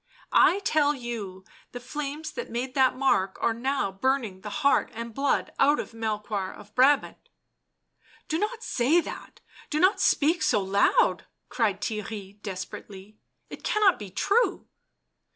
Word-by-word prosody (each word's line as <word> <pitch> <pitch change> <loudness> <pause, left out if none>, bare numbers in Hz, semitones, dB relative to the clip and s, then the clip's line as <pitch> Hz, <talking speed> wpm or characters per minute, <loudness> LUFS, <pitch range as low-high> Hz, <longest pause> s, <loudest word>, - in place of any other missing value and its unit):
" - - -44 0.2
I 370 - -2
tell 295 -5 +2
you 215 -7 -6 0.3
the 245 - -5
flames 295 +4 -5
that 475 - -6
made 250 +2 -3
that 260 -1 +3
mark 195 -8 +1
are 230 - +1
now 260 -2 -1
burning 220 -2 -1
the 210 - -6
heart 275 +8 +2
and 230 0 -6
blood 275 +3 0
out 290 +2 +4
of - - -6
Melehoir 210 -3 -3
of 210 0 -14
Brabant." 270 +4 +3 0.6
" - - -32
Do 315 - -1
not 445 +3 -3
say 265 +8 +2
that - - -8
— - - -20
do 305 - -1
not 370 +5 +3
speak 320 +3 +3
so - - +3
loud 200 - +2
!" - - -51
cried 210 -5 0
Theirry 210 -2 -5
desperately, 195 +1 -8 0.2
" - - -48
it - - -9
cannot 415 -4 +3
be 205 -2 -7
true." 405 - +1
240 Hz, 165 wpm, -26 LUFS, 205-290 Hz, 0.6 s, out